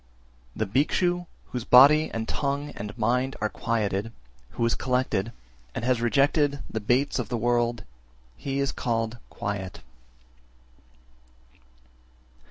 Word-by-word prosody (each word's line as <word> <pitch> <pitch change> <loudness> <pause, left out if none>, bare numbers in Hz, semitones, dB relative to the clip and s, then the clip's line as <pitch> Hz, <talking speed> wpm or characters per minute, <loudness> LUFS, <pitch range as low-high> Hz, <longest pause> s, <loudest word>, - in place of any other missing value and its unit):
378. - - -13
The 110 +3 +1 0.4
Bhikshu 175 - -10 0.3
whose 125 -2 -3
body 145 +6 +7
and 115 0 -3
tongue 140 +1 -2
and 105 +2 -7
mind 125 +4 +1
are 110 - 0
quieted, 105 -2 -1 0.5
who 115 - +2
is 115 - +2
collected, 125 -5 0 0.4
and 115 - -3
has 125 -2 +2
rejected 140 +4 +2
the 110 - -3
baits 125 +7 +1
of 125 - -3
the 120 - -1
world, 120 0 +1 0.5
he 135 - -4
is 140 0 +1
called 115 -1 -2
quiet. 100 -3 -5
120 Hz, 125 wpm, -26 LUFS, 110-135 Hz, 0.5 s, body